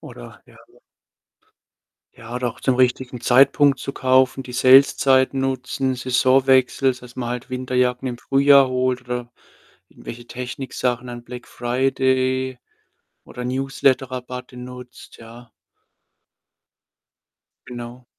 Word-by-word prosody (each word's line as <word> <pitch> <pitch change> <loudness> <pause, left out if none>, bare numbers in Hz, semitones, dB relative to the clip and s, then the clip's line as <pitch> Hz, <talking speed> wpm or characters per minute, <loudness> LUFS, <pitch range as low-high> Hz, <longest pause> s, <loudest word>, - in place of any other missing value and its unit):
Oder - - -12
ja, - - -20
ja - - -25 1.4
Ja, 115 0 -11
oder 125 0 -2
auch 115 - -10
zum 130 - +1
richtigen 125 0 0
Zeitpunkt 135 +3 +4
zu 140 - -5
kaufen, 130 0 +2
die 125 - -10
Saleszeit 130 +1 +4
nutzen, 130 0 -2
Saisonwechsel, 130 +1 +2
dass 125 -1 -14
man 120 -2 -4
halt 125 +1 -6
Winterjacken 125 0 -1
im 120 -2 -4
Frühjahr 140 0 +4
holt 130 0 -1
oder 125 -1 -6 0.6
irgendwelche 120 0 -11
Techniksachen, 125 0 -4
dann 120 -1 -8
Black 125 0 -10
Friday, 130 +1 -1 0.7
oder 125 - -9
Newsletterrabatte 130 -1 -2
nutzt, 125 0 -11
ja. 115 +1 -14 2.2
Genau. 120 0 -9
125 Hz, 110 wpm, -21 LUFS, 125-130 Hz, 2.2 s, Zeitpunkt